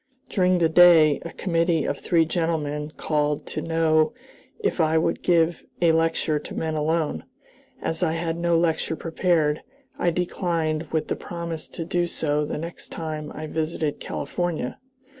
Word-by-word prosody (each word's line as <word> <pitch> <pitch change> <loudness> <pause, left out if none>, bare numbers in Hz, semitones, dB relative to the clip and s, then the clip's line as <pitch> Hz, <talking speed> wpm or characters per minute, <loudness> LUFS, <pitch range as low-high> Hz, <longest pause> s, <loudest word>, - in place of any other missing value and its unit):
During 185 -2 +3
the 170 -2 +4
day 160 -3 +7
a 170 - -6
committee 165 -3 +1
of 140 - -2
three 165 -2 +3
gentlemen 155 -3 -1
called 150 -1 0
to - - -4
know 160 +2 +2 0.4
if 430 - 0
I 160 0 +3
would 160 - 0
give 170 -1 +2 0.2
a 170 -2 +5
lecture 165 -1 +1
to - - -9
men 160 -1 -2
alone. 155 - 0 0.6
As 165 +1 -1
I 165 -3 +2
had 165 0 -2
no 170 0 +2
lecture 165 -1 +1
prepared, 160 -2 +1 0.4
I 175 - +2
declined, 165 -2 -1
with 160 -1 0
the - - -1
promise 170 -2 -5
to 165 - -6
do 175 +1 0
so 150 -3 0
the 150 - -4
next 165 +3 -7
time 155 -2 -5
I 155 - -5
visited 155 -1 -2
California. 165 -3 -3
165 Hz, 160 wpm, -24 LUFS, 155-170 Hz, 0.6 s, day